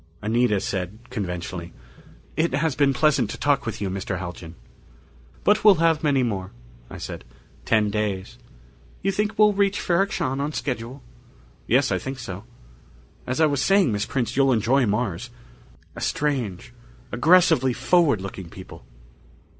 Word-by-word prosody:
Anita 110 -1 +2
said 95 +1 -3
conventionally, 90 -4 -5 0.6
"It 160 -3 +1
has 150 -1 0
been 140 0 +3
pleasant 135 -4 +2
to - - -5
talk 145 -4 +1
with 115 - -4
you, 100 - -2
Mr. 95 0 -3
Haljan." 85 -2 -7 0.9
"But 210 +2 +3
we'll 210 -2 +8
have 165 -1 +2
many 140 -4 +2
more," 95 -6 -2 0.4
I - - -8
said. - - -7 0.4
"Ten 105 -2 +2
days 100 -3 -3 0.3
" - - -28
"You 195 - +2
think 210 +2 -2
we'll 210 0 +5
reach 200 0 +1
Ferrok 195 +4 +1
Shahn 135 +2 -1
on 150 +2 -2
schedule?" 125 -1 -4 0.6
"Yes. - - +3
I - - +1
think 135 0 -6
so.... 100 -4 -7 0.8
As 130 +4 -2
I 160 - +6
was 140 -3 +1
saying, 195 - +3
Miss 105 0 -1
Prince, 125 -4 -2
you'll 135 -1 +4
enjoy 125 +2 +2
Mars. 105 0 -2 0.7
A - - -8
strange, 125 -9 -2 0.4
aggressively 160 -2 +4
forward 140 - +2
looking 95 -2 -7
people." 95 +2 -12
125 Hz, 155 wpm, -24 LUFS, 100-155 Hz, 0.9 s, we'll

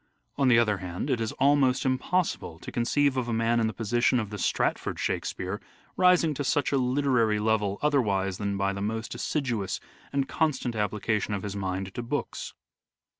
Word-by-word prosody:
On 140 -2 +2
the 120 -2 +6
other 105 -3 +3
hand 90 +9 -4
it 120 -3 0
is 110 - -1
almost 135 -2 +3
impossible 130 - 0
to - - -9
conceive 135 +3 +1
of 125 -2 -1
a 120 - -1
man 115 +1 +2
in 115 - +2
the - - -1
position 120 +3 +1
of 105 -2 -4
the 105 - -5
Stratford - - 0
Shakspere 95 +2 -2 0.3
rising 180 -4 +4
to 145 - -3
such 145 0 +1
a 140 - +2
literary 125 -4 +2
level 105 -2 +1
otherwise 100 -10 +1
than 100 -1 -1
by 100 0 0
the 100 - -5
most 110 +2 -3
assiduous 120 -5 -2 0.3
and 140 -1 0
constant 135 -7 0
application 105 0 -1
of 95 - -5
his 100 -1 -4
mind 95 0 -3
to - - -4
books. 120 - -4
115 Hz, 180 wpm, -27 LUFS, 105-135 Hz, 0.3 s, the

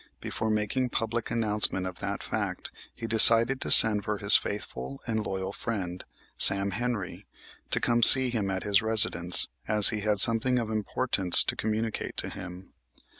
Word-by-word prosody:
Before 110 - -10
making 110 +4 -7
public 115 0 -9
announcement 105 -4 +2
of 90 -1 -13
that 100 -1 -11
fact - - -10 0.2
he 115 - -14
decided 115 +3 +2
to - - -8
send 105 -3 +9
for 105 0 -9
his 100 0 +5
faithful 70 -10 -9
and 110 -2 -8
loyal 95 0 -11
friend, 95 -6 -11 0.3
Sam 100 0 +1
Henry, 115 -2 -11 0.4
to - - -2
come 120 0 -6
to - - +13
see 130 -1 +5
him 105 -5 -8
at 95 -1 -10
his 100 -1 -4
residence, 105 -6 -1 0.2
as 105 -1 +1
he 105 - -10
had 105 -1 -6
something 115 +4 +1
of 115 -2 -9
importance 105 -3 -2
to - - -8
communicate 110 +1 -10
to - - -7
him. 90 0 -16
105 Hz, 170 wpm, -21 LUFS, 100-115 Hz, 0.4 s, to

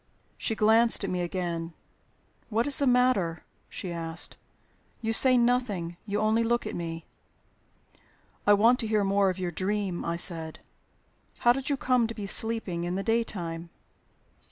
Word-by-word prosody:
She 225 - -2
glanced 225 +1 +4
at 195 - -3
me 180 -1 -2
again. 170 -2 -4 0.8
"What 230 +1 0
is 285 - +4
the 280 - +1
matter?" 245 -10 +1 0.2
she 180 - -6
asked. 165 0 -3 0.6
"You 225 -1 -2
say 255 +2 +6
nothing; 235 -8 0
you 205 0 -1
only 220 +2 +2
look 240 +1 0
at - - -5
me." 165 -1 -6 1.4
"I 205 - +7
want 230 +5 +4
to 225 - -2
hear 215 -1 +1
more 195 0 +2
of 185 - -3
your 180 -2 -3
dream," 190 +1 -2
I 170 - -2
said. 165 -2 -2 0.8
"How 240 - +5
did 270 +2 -4
you 285 - 0
come 250 -3 +1
to 230 - -7
be 210 - -6
sleeping 200 -4 +2
in 175 +1 -3
the 195 - -3
daytime?" 175 -8 -2
205 Hz, 160 wpm, -27 LUFS, 175-230 Hz, 1.4 s, I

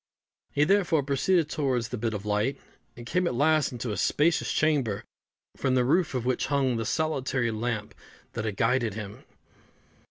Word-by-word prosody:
He, 145 - +2
therefore, 175 -4 +3
proceeded 150 +5 +2
towards 130 -6 -1
the 125 - -4
bit 110 -1 -1
of 100 0 -6
light, 105 +6 0 0.4
and 120 - -9
came 180 +7 0
at 125 - -1
last 155 +3 +3
into 120 -2 -4
a 105 - -3
spacious 160 +9 +2
chamber, 140 -10 +1 0.5
from 130 -2 0
the 125 -1 +3
roof 150 +2 +2
of 125 -2 -2
which 130 0 0
hung 135 -4 +1
the 115 - -2
solitary 135 -6 0
lamp 110 -1 -3 0.4
that 110 - -3
had 105 -3 -3
guided 115 -2 +1
him. 105 -1 -7
130 Hz, 170 wpm, -27 LUFS, 115-150 Hz, 0.5 s, therefore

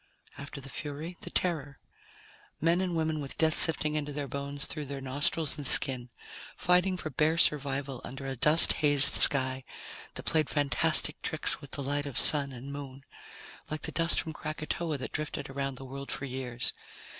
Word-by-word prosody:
After 140 0 -9
the 135 - -10
Fury, 150 +5 -7
the - - -7
Terror. 150 -6 -3 0.8
Men 165 +3 +1
and 180 -2 -3
women 160 -1 -2
with 140 -2 -8
death 160 -1 +1
sifting 155 -3 +4
into 150 -1 -4
their 145 -1 -6
bones 140 +1 -6
through 150 -2 -5
their 140 0 -7
nostrils 140 +4 -1
and 145 -3 -2
skin, 125 -3 +6 0.5
fighting 180 +1 +1
for 155 -3 -7
bare 155 +5 0
survival 140 -4 0
under 135 +1 -9
a 135 0 -5
dust 150 +6 +7
hazed 145 -2 +3
sky 130 -1 +3 0.5
that - - -7
played 155 -3 0
fantastic 145 -4 0
tricks - - -3
with - - -12
the 140 - -3
light 145 +1 -3
of 140 - -6
Sun 140 -2 +6
and 130 +2 -10
Moon, 140 -1 -10 0.7
like 155 0 -6
the - - -1
dust 165 +1 +3
from 160 - -5
Krakatoa 155 +1 -5
that 130 - -8
drifted 150 -2 -6
around 135 0 -5
the 135 - -10
world 140 +1 -9
for 140 - -4
years. 130 -2 -2
145 Hz, 180 wpm, -28 LUFS, 135-155 Hz, 0.8 s, dust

